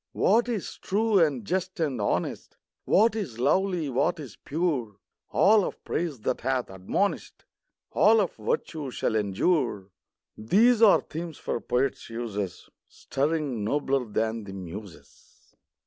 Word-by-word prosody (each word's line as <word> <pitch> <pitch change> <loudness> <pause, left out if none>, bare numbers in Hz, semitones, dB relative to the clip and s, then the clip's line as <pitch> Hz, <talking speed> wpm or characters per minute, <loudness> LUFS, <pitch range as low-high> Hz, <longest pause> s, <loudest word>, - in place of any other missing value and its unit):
What 235 +4 +3
is 220 -6 -4
true 215 +1 +2
and 140 - +1
just 185 - -2
and 140 -8 -1
honest, 100 - -2 0.3
What 220 +3 +4
is 180 - -4
lovely, 180 +5 +1
what 135 +4 0
is 135 -8 -9
pure, 140 - -2 0.2
— - - -59
All 210 +1 +5
of - - -5
praise 155 -9 -3
that - - -1
hath 130 -3 -1
admonish'd, 95 - -2 0.5
All 225 +1 +5
of 195 - 0
virtue, 165 - -3
shall 115 - -1
endure, 105 - 0 0.2
— - - -64
These 220 - +4
are 215 -4 +7
themes 165 0 -7
for - - -3
poets' 130 +2 -1
uses, 105 -5 -5 0.2
Stirring 140 -5 -2
nobler 135 +2 0
than 110 +1 -2
the 95 - -8
Muses. 95 +1 -11
140 Hz, 140 wpm, -27 LUFS, 110-185 Hz, 0.5 s, are